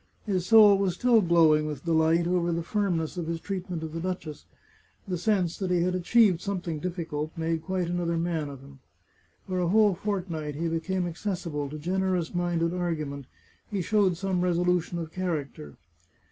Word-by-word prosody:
His 185 Hz, -4 st, -1 dB
soul 210 Hz, -3 st, +7 dB
was 190 Hz, -3 st, 0 dB
still 235 Hz, +1 st, +4 dB
glowing 160 Hz, -4 st, +4 dB
with 150 Hz, -1 st, -6 dB
delight 165 Hz, +1 st, +3 dB
over 175 Hz, -1 st, +1 dB
the 170 Hz, 0 st, -1 dB
firmness 175 Hz, -4 st, -1 dB
of 170 Hz, -2 st, -3 dB
his 165 Hz, 0 st, -2 dB
treat 190 Hz, 0 st, -5 dB
ment 170 Hz, -3 st, -4 dB
of 160 Hz, -1 st, -6 dB
the 165 Hz, -, -3 dB
duchess. 170 Hz, -4 st, -5 dB, 0.6 s
The 185 Hz, -, -1 dB
sense 180 Hz, -2 st, 0 dB
that 190 Hz, -2 st, -2 dB
he 175 Hz, -1 st, +2 dB
had 180 Hz, +1 st, 0 dB
achieved 185 Hz, 0 st, +3 dB
some 200 Hz, -1 st, -2 dB
thing 165 Hz, -3 st, -4 dB
difficult 160 Hz, -3 st, -4 dB
made 165 Hz, 0 st, -1 dB
quite 185 Hz, 0 st, -2 dB
another 170 Hz, -1 st, -1 dB
man 165 Hz, -3 st, -1 dB
of 135 Hz, -2 st, -10 dB
him. 135 Hz, 0 st, -15 dB, 0.7 s
For 185 Hz, -1 st, -1 dB
a 175 Hz, -, +1 dB
whole 210 Hz, +2 st, +4 dB
fortnight 175 Hz, -6 st, -3 dB
he 165 Hz, +3 st, -2 dB
became 180 Hz, +3 st, -1 dB
accessible 170 Hz, -5 st, -4 dB
to 155 Hz, -, -6 dB
generous 180 Hz, +1 st, -1 dB
minded 175 Hz, -1 st, 0 dB
argu 170 Hz, -4 st, -2 dB
ment; 140 Hz, -2 st, -8 dB, 0.4 s
he 200 Hz, -4 st, -2 dB
showed 200 Hz, -3 st, +2 dB
some 190 Hz, -1 st, -1 dB
resolution 180 Hz, -1 st, +1 dB
of 165 Hz, -2 st, -5 dB
character. 150 Hz, -, -4 dB
175 Hz, 185 wpm, -27 LUFS, 160-185 Hz, 0.7 s, soul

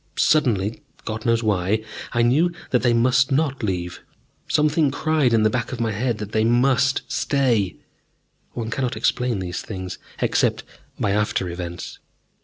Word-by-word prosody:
Suddenly, 115 Hz, -9 st, +2 dB, 0.2 s
God 110 Hz, +1 st, -4 dB
knows 115 Hz, 0 st, +2 dB
why, 105 Hz, +1 st, +1 dB, 0.3 s
I 120 Hz, -, +2 dB
knew 150 Hz, +9 st, +3 dB, 0.2 s
that 125 Hz, -, +3 dB
they 120 Hz, -, +3 dB
must 125 Hz, +3 st, +3 dB
not 140 Hz, -1 st, +1 dB
leave. 90 Hz, -4 st, -3 dB, 0.5 s
Something 150 Hz, 0 st, +2 dB
cried 155 Hz, -2 st, +1 dB
in 115 Hz, -2 st, +3 dB
the 110 Hz, -, +4 dB
back 120 Hz, -2 st, -2 dB
of 130 Hz, -, -5 dB
my 115 Hz, -1 st, 0 dB
head 115 Hz, +2 st, -1 dB
that 105 Hz, -1 st, -6 dB
they 110 Hz, -1 st, +1 dB
must 130 Hz, +3 st, +3 dB
stay 120 Hz, -9 st, +1 dB, 0.8 s
one 115 Hz, -1 st, -4 dB
cannot 125 Hz, -4 st, -2 dB
explain 125 Hz, 0 st, 0 dB
these 90 Hz, -1 st, -4 dB
things, 95 Hz, -3 st, -6 dB, 0.2 s
except -, -, +1 dB, 0.4 s
by 100 Hz, -, +1 dB
after 105 Hz, -3 st, 0 dB
events. 85 Hz, 0 st, -6 dB
115 Hz, 155 wpm, -22 LUFS, 105-130 Hz, 0.8 s, the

